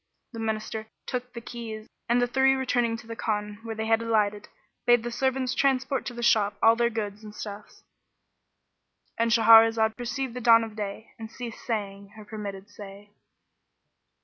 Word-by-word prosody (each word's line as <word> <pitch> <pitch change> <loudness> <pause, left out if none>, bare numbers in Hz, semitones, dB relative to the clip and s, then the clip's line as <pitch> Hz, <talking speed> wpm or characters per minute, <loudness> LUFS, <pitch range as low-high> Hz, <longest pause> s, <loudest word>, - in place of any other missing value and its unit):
The 230 - -7
Minister 220 0 -3 0.2
took 250 -1 -4
the 235 - -8
keys 225 -2 -7 0.2
and 240 +1 +4
the 245 - +3
three 265 +2 +3
returning 245 -3 0
to 225 - -13
the 230 0 -7
Khan 210 -2 -3
where 225 -1 -6
they 220 0 -3
had 225 0 +2
alighted, 210 -2 0 0.4
bade 240 -1 +5
the 240 - -4
servants 260 +1 0
transport 265 0 0
to 245 - -5
the 240 - -5
shop 210 -3 +3
all 225 0 +6
their 235 0 +2
goods 210 -2 -5
and 210 0 -10
stuffs.—And 210 +2 -9
Shahrazad 225 -1 +6
perceived 245 +1 -4
the 250 - -6
dawn 230 -1 +6
of 220 -1 -8
day 210 +1 -6
and 220 -1 -7
ceased 235 -1 -8
saying 200 -3 -4
her 215 -1 -11
permitted 205 -2 -7
say. 205 0 -12
225 Hz, 170 wpm, -26 LUFS, 210-240 Hz, 0.4 s, all